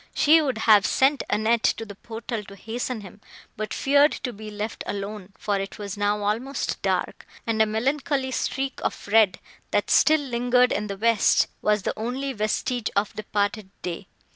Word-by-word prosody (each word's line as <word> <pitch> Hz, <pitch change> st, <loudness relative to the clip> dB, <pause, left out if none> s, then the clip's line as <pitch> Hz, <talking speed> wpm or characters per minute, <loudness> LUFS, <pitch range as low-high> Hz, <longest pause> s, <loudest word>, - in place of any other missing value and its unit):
She 320 Hz, +2 st, +6 dB
would 265 Hz, -6 st, -1 dB
have 215 Hz, -2 st, +5 dB
sent 275 Hz, +1 st, +3 dB
Annette 220 Hz, +2 st, +2 dB, 0.2 s
to 225 Hz, -, -5 dB
the 205 Hz, -, -9 dB
portal 225 Hz, +1 st, -6 dB
to 200 Hz, -, -12 dB
hasten 225 Hz, +3 st, -4 dB
him, 200 Hz, +1 st, -13 dB, 0.3 s
but 215 Hz, 0 st, -4 dB
feared 285 Hz, +2 st, +4 dB
to 250 Hz, -, -3 dB
be 215 Hz, +1 st, -9 dB
left 210 Hz, +1 st, -5 dB
alone, 200 Hz, -1 st, -5 dB
for 205 Hz, -2 st, -1 dB
it 195 Hz, 0 st, -5 dB
was 200 Hz, -2 st, -5 dB
now 205 Hz, 0 st, 0 dB
almost 235 Hz, +7 st, -2 dB
dark, -, -, -2 dB, 0.2 s
and 225 Hz, -1 st, +1 dB
a 220 Hz, -, +4 dB
melancholy 270 Hz, +4 st, -1 dB
streak 270 Hz, +1 st, -2 dB
of -, -, -3 dB
red, 210 Hz, -3 st, +4 dB, 0.3 s
that -, -, 0 dB
still 310 Hz, -1 st, +5 dB
lingered 250 Hz, -1 st, +2 dB
in 210 Hz, +1 st, -1 dB
the 200 Hz, -1 st, -5 dB
west, 230 Hz, 0 st, +3 dB
was 210 Hz, -2 st, +1 dB
the -, -, -1 dB
only 255 Hz, +5 st, -3 dB
vestige 220 Hz, +2 st, -1 dB
of 200 Hz, +1 st, +1 dB
departed 205 Hz, -1 st, -2 dB
day. 180 Hz, +2 st, -5 dB
220 Hz, 175 wpm, -25 LUFS, 205-250 Hz, 0.3 s, She